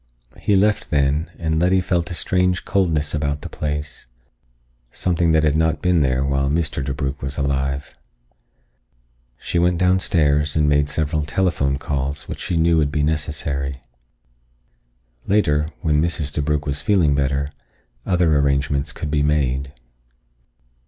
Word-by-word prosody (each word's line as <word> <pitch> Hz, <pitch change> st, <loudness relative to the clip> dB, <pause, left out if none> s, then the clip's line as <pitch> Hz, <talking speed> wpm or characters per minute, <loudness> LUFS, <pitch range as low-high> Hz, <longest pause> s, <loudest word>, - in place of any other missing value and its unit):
He 105 Hz, -, +2 dB
left 105 Hz, +2 st, +2 dB
then, 75 Hz, +2 st, +1 dB
and 80 Hz, -2 st, -1 dB
Letty 90 Hz, +2 st, +3 dB
felt 85 Hz, -2 st, -1 dB
a 85 Hz, -, -5 dB
strange 90 Hz, +1 st, 0 dB
coldness 80 Hz, -6 st, 0 dB
about 75 Hz, -1 st, -1 dB
the -, -, -6 dB
place, 75 Hz, -2 st, -4 dB, 0.8 s
something 85 Hz, -2 st, 0 dB
that 80 Hz, -1 st, +3 dB
had 75 Hz, -1 st, +2 dB
not 80 Hz, 0 st, +1 dB
been 90 Hz, -2 st, +3 dB
there 65 Hz, -1 st, +1 dB
while 70 Hz, 0 st, 0 dB
Mr. 75 Hz, -2 st, -1 dB
DeBrugh 70 Hz, 0 st, -3 dB
was 70 Hz, +1 st, -4 dB
alive. 70 Hz, 0 st, -2 dB, 1.4 s
She 85 Hz, -, -2 dB
went 90 Hz, 0 st, +2 dB
downstairs 80 Hz, -5 st, +2 dB
and 75 Hz, -1 st, +2 dB
made 75 Hz, 0 st, +2 dB
several 75 Hz, 0 st, -1 dB
telephone 75 Hz, -3 st, 0 dB
calls 70 Hz, +1 st, -3 dB
which -, -, -6 dB
she 90 Hz, -3 st, -2 dB
knew 85 Hz, 0 st, +3 dB
would 75 Hz, -2 st, +1 dB
be 75 Hz, -2 st, 0 dB
necessary. 75 Hz, -3 st, -2 dB, 1.5 s
Later, 75 Hz, -7 st, +2 dB
when 75 Hz, -2 st, +2 dB
Mrs. 80 Hz, -3 st, -1 dB
DeBrugh 75 Hz, 0 st, -1 dB
was 70 Hz, 0 st, -2 dB
feeling 90 Hz, -8 st, +3 dB
better, 70 Hz, +1 st, 0 dB, 0.5 s
other 85 Hz, -4 st, +2 dB
arrangements 70 Hz, +1 st, +1 dB
could 75 Hz, 0 st, -5 dB
be 75 Hz, -1 st, +1 dB
made. 70 Hz, -2 st, 0 dB
75 Hz, 140 wpm, -21 LUFS, 70-85 Hz, 1.5 s, Letty